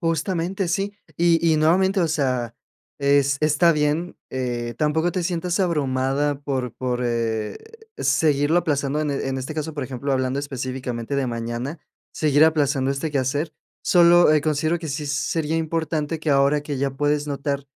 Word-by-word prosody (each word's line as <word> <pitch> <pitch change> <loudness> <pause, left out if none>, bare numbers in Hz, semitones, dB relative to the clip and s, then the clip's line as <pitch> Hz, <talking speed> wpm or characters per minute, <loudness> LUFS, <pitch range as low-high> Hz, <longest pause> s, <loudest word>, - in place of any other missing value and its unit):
justamente 170 +3 -1
sí, 195 +4 -1 0.2
y 170 -1 +3
y - - +3
nuevamente, 190 +5 +3
o 170 - +2
sea, 130 -6 -1 0.4
es 140 0 +3
está 155 +3 +4
bien, 150 +3 -1
eh, 120 -2 -3
tampoco 160 +4 +1
te 180 -1 -1
sientas 175 +2 -1
abrumada 140 -3 0
por 130 -4 -3
por, 125 -1 -2
eh, 115 -2 -1 0.4
seguirlo 150 +2 +2
aplazando 145 -3 0
en 150 -1 -1
en 135 -1 -2
este 130 +4 -5
caso, 155 +1 -3
por 145 -3 -3
ejemplo, 135 +2 -3
hablando 130 +1 0
específicamente 130 -2 -4
de 135 -1 0
mañana, 120 +5 -4 0.3
seguir 150 0 +3
aplazando 140 -4 +2
este 140 +3 -2
quehacer. 145 +3 -1 0.3
Solo, 175 -1 +6
eh, 155 - +4
considero 155 +2 0
que 165 -1 -6
sí 145 +1 -3
sería 155 +2 -1
importante 160 -1 -2
que 155 - -4
ahora 140 +1 +3
que 145 -1 -4
ya 135 +1 0
puedes 145 +2 0
notar 140 -1 -3
145 Hz, 160 wpm, -23 LUFS, 135-160 Hz, 0.4 s, Solo